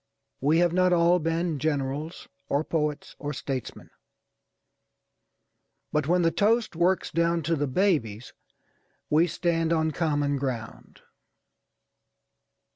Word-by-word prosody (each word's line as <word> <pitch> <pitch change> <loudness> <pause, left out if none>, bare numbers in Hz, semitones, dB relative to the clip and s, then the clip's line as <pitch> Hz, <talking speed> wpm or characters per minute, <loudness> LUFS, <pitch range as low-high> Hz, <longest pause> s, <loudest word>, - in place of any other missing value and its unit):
We 150 +4 +2
have 175 0 +3
not 185 0 +3
all 175 +1 +4
been 165 -1 -1
generals, 145 +2 -3 0.2
or 145 +2 +1
poets, 150 -2 -3
or 145 0 -4
statesmen; 130 -2 -6 2.0
but 150 -1 0
when 175 +1 +3
the 165 - +3
toast 220 +1 +1
works 180 +3 +1
down 170 0 +1
to 165 +3 +1
the 145 -1 -1
babies, 130 - 0 0.8
we 160 +3 +4
stand 165 -1 0
on 160 -1 +1
common 145 -3 0
ground. 125 -5 -6
160 Hz, 115 wpm, -26 LUFS, 145-170 Hz, 2.0 s, all